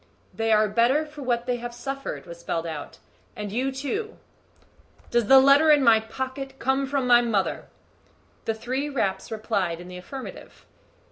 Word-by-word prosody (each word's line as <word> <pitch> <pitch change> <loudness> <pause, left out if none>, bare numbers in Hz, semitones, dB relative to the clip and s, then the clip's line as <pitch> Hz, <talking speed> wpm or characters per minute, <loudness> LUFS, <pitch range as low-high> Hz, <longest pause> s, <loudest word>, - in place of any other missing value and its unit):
"They 225 +3 -1
are 215 0 +4
better 240 +8 +2
for 300 -1 -11
what 240 -2 -1
they 245 -1 -1
have 240 0 -7
suffered," 270 +3 -5
was 170 -1 -10
spelled 170 -1 -3
out; 155 -3 -6 0.4
"and 210 -1 -5
you 255 +5 -1
too." 290 +12 -4 0.9
"Does 240 -3 +2
the 270 - +8
letter 280 +4 +6
in 295 -2 +6
my 230 -3 +6
pocket 260 +4 -6
come 270 +2 0
from 275 -1 -1
my 240 -1 +6
mother?" 215 -5 -1 0.8
The 225 - -1
three 260 +6 -3
raps 195 -9 -2
replied 200 -6 -1
in 175 +1 -10
the 180 - -8
affirmative. 265 +9 -10
240 Hz, 165 wpm, -25 LUFS, 215-270 Hz, 0.9 s, the